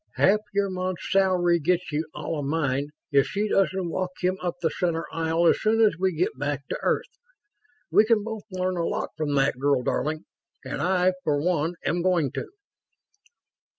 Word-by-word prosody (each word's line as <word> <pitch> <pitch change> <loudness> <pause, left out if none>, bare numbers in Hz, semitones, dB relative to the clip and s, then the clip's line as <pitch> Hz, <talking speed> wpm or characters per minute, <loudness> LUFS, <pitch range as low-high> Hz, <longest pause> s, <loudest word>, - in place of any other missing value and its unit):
Half 205 +2 +4
your 200 -1 0
month's 185 -1 -3
salary 180 -3 +3
gets 180 +3 0
you 150 +1 -1
all 160 - -3
of 145 - -3
mine 145 -2 0 0.2
if 140 -1 +4
she 205 +2 -1
doesn't 190 -2 +1
walk 185 +2 -2
him 185 +1 +1
up 175 -1 -2
the 165 -3 0
center 165 -1 -1
aisle 165 +1 +1
as - - +4
soon 220 +1 +2
as 215 -5 +4
we 190 0 +2
get 170 +1 -1
back 145 -2 -3
to - - -3
Earth. - - -1 0.7
We 210 - +6
can 220 -2 +3
both 220 -1 -6
learn 185 -1 -2
a 170 - 0
lot - - -2
from 150 -2 -1
that 135 -2 +2
girl, 140 -2 +2
darling. 155 +5 -1 0.4
And - - -4
I, 185 0 +2
for 145 -1 +1
one 165 +1 0
am 175 +1 +1
going 170 -7 +2
to." - - -4
175 Hz, 185 wpm, -25 LUFS, 155-185 Hz, 0.7 s, We